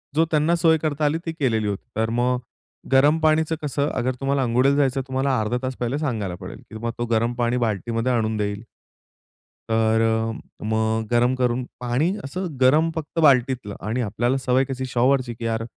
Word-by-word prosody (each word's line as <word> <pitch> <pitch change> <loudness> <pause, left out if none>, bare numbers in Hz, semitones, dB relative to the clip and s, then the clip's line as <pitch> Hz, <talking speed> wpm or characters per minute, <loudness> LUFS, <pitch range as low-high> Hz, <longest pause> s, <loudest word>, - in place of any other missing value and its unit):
जो 160 +2 +4
त्यांना 155 +2 +3
सोय 165 -1 +4
करता 155 -1 -1
आली 150 +2 +2
ती 165 - -2
केलेली 115 -9 0
होती. 100 -1 -4
तर 110 0 +1
मग 125 +2 +1 0.5
गरम 145 +4 +5
पाणीचं 160 0 +2
कसं? 145 0 -1
अगर 130 +1 -1
तुम्हाला 135 0 +1
अंघोळीला 125 +3 +3
जायचं 140 -2 +2
तर 130 - -12
तुम्हाला 130 -1 0
अर्धा 110 +3 -1
तास 130 0 -3
पहिले 125 +3 -2
सांगायला 110 - -2
पडेल, 95 - -8
की - - -19
तुम्हाला 115 +1 -4
तो - - -1
गरम 115 +2 +1
पाणी 120 0 0
बाल्टीमध्ये 115 +1 -1
आणून 110 -2 0
देईल. 105 0 -2 1.1
तर 110 0 +3
अ, 115 0 0 0.2
मग 110 +1 0
गरम 120 +2 +3
करून 125 0 0 0.2
पाणी 125 +8 0
असं 180 +7 -4
गरम 150 +6 +5
फक्त 160 +1 -4
बाल्टीतलं 130 -7 +3
आणि 115 +4 -1
आपल्याला 120 +4 0
सवय 130 0 +2
कशी 130 0 -4
शॉवरची 130 0 +1
की 115 0 -7
यार 115 0 -1
125 Hz, 185 wpm, -23 LUFS, 115-140 Hz, 1.1 s, गरम